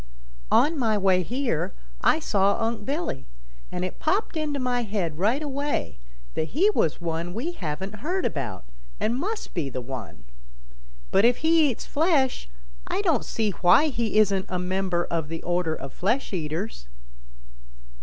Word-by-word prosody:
"On 305 +1 +4
my 220 -4 +2
way 190 -2 +3
here 235 - -1 0.3
I - - +5
saw 200 -8 +2
Unc' 225 -2 -2
Billy, 280 - -3 0.4
and 180 0 -2
it 185 - -6
popped 380 +4 0
into 300 -3 -1
my 250 -1 0
head 195 -8 -2
right 230 +10 +2
away 280 - -2 0.3
that 160 - -3
he 400 +6 +5
was 165 - +1
one 170 +1 -3
we 280 +10 -2
haven't 190 - -5
heard 355 - -1
about, 105 - -3 0.3
and 230 - +1
must 415 - -3
be 155 -6 -1
the 130 - -4
one. 125 - -7 0.9
But 195 - +4
if 240 +1 +5
he 320 -2 +5
eats 240 - -4
flesh, 285 - +1 0.4
I - - -1
don't - - +2
see 220 -2 0
why 190 - +5
he 230 -5 -1
isn't 200 -2 +3
a 185 - -1
member 180 -1 0
of 165 -3 -2
the 165 +1 -5
order 175 -2 0
of 135 -2 -8
flesh 225 +6 0
eaters." 160 - -3
205 Hz, 160 wpm, -26 LUFS, 170-275 Hz, 0.9 s, I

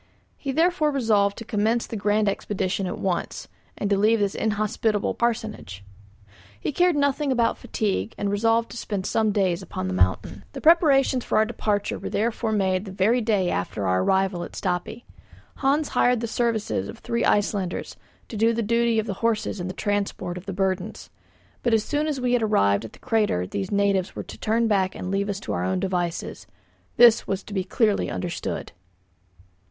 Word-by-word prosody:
He 275 - -4
therefore 325 +1 +2
resolved 215 -7 +2
to 230 - -7
commence 225 +1 0
the - - -7
grand 210 +1 +1
expedition 195 -1 -1
at 180 - -4
once, 185 -3 -3 0.3
and 205 - -1
to 200 - +4
leave 215 +3 +4
this 200 -2 0
inhospitable 215 0 0
parsonage. 220 - -3 0.8
He - - -2
cared 355 +3 +3
nothing 285 0 +1
about 235 -3 +1
fatigue, 155 - -2
and 200 0 -1
resolved 225 +3 +1
to - - -8
spend 200 -4 -3
some 220 -1 +1
days 190 -4 +1
upon 95 - -5
the 90 - -2
mountain. 90 +1 0
The - - -6
preparations 285 -6 +4
for - - 0
our 215 - +5
departure 210 -3 -2
were - - -5
therefore 225 +1 -1
made 190 -2 +1
the 195 - -7
very 210 +6 +2
day 205 -5 +1
after 95 +2 -2
our 95 0 +2
arrival 190 - +1
at - - -9
Stapi. 190 +5 -3 0.5
Hans 285 +2 +1
hired 245 -2 +2
the - - -1
services 225 -2 -1
of 225 - -8
three 235 0 -2
Icelanders 200 -3 0 0.3
to - - -8
do 225 +2 +3
the 230 0 -1
duty 230 +1 +2
of 220 - +1
the 200 - -3
horses 220 -3 0
in 175 - -3
the - - -3
transport 200 -2 -2
of 180 +1 -9
the - - -2
burdens; 190 0 -2 0.5
but 240 -2 +3
as 215 - +1
soon 295 +4 -1
as 295 -3 -2
we 250 -1 0
had 245 - +3
arrived 100 - +2
at - - -10
the - - -14
crater 210 - 0
these 95 +1 -4
natives 200 -2 +1
were - - -4
to - - -10
turn 230 +1 +1
back 190 -3 +1
and 185 - -5
leave 200 +1 0
us 200 -1 -2
to - - -4
our - - -1
own 185 0 0
devices. 180 -3 -3 0.5
This 235 -2 +6
was 195 0 -2
to 210 - -10
be 190 -2 0
clearly 210 +2 +1
understood. 175 -1 -4
210 Hz, 190 wpm, -24 LUFS, 190-230 Hz, 0.8 s, This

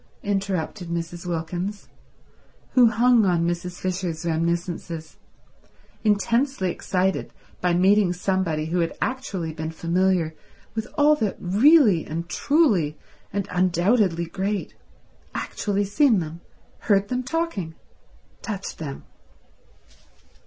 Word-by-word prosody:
interrupted 195 -2 -2
Mrs. 170 +1 -4
Wilkins, 175 +4 -3 0.8
who 250 -2 +6
hung 235 +1 +4
on 175 -3 +2
Mrs. 175 +1 -3
Fisher's 180 -3 -3
reminiscences, 170 -1 -2 0.9
intensely 230 0 +1
excited 185 +1 -1 0.3
by 180 -1 +2
meeting 195 +1 +4
somebody 180 -4 -1
who 170 +3 -1
had 165 -1 -1
actually 195 -11 -3
been 160 0 -4
familiar 170 0 +1 0.4
with 220 -1 -3
all 300 0 +5
the 215 -9 -1
really 210 - +5
and 165 +2 -5
truly 195 - +2 0.3
and 200 -1 -2
undoubtedly 180 0 +2
great—actually 200 +1 -4
seen 230 +3 +3
them, 165 -1 -4 0.4
heard 200 -1 +2
them 250 0 0
talking, 255 - -3 0.7
touched 200 -3 -5
them. 140 -4 -6
185 Hz, 105 wpm, -24 LUFS, 170-210 Hz, 0.9 s, who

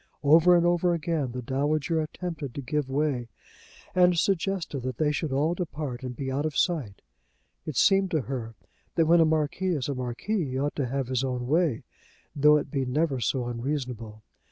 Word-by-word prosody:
Over 165 +5 +6
and 170 - +2
over 175 0 +2
again 155 -5 -2
the 125 +1 -5
dowager 150 +5 0
attempted 155 -4 -5
to 140 - -4
give 145 0 -2
way, 135 -3 0 0.7
and 180 -1 +4
suggested 190 -4 0
that 125 -1 -4
they 150 -2 +2
should 150 0 -2
all 145 +5 +1
depart 150 -7 -4
and 125 -1 -6
be 135 +1 -4
out 140 +2 -1
of 155 -2 -2
sight. 145 - -1 0.6
It 155 - -4
seemed 195 -1 +4
to 160 -4 0
her 120 -4 -5 0.4
that 165 - +3
when 170 +2 +5
a 165 - +6
marquis 160 +4 0
is 135 -4 -2
a 140 - -1
marquis 130 - -2
he 130 -1 -4
ought 145 +2 -1
to 140 -4 0
have 135 0 -2
his 130 0 0
own 125 -2 -2
way, 155 -2 +1 0.5
though 150 +1 +6
it 145 -2 -4
be 135 -2 0
never 135 +1 0
so 125 +2 -1
unreasonable. 120 -3 -4
145 Hz, 190 wpm, -27 LUFS, 130-165 Hz, 0.7 s, Over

